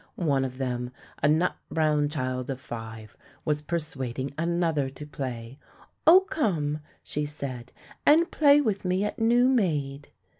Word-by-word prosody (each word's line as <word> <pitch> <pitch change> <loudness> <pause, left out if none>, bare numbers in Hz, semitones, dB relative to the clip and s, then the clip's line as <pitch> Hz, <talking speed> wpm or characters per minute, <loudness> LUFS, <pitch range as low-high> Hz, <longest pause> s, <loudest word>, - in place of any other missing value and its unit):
One 140 -6 +1
of 130 -1 -4
them, 125 -2 -2 0.3
a 145 - +4
nut 160 +4 +2
brown 150 -2 +2
child 130 -3 -3
of 135 -1 -3
five, 115 -4 -8 0.3
was 150 -1 0
persuading 140 -5 -4
another 165 -3 0
to 135 +3 -9
play. 130 -3 -6 0.5
"Oh 360 +4 +9
come," 170 - -1 0.2
she 150 0 -3
said, 130 -4 -6 0.3
"and 325 +3 +5
play 290 -1 +5
with 215 -8 -1
me 185 +1 +1
at 210 - -3
new 240 +2 +4
maid." 150 - 0
150 Hz, 145 wpm, -27 LUFS, 130-180 Hz, 0.5 s, Oh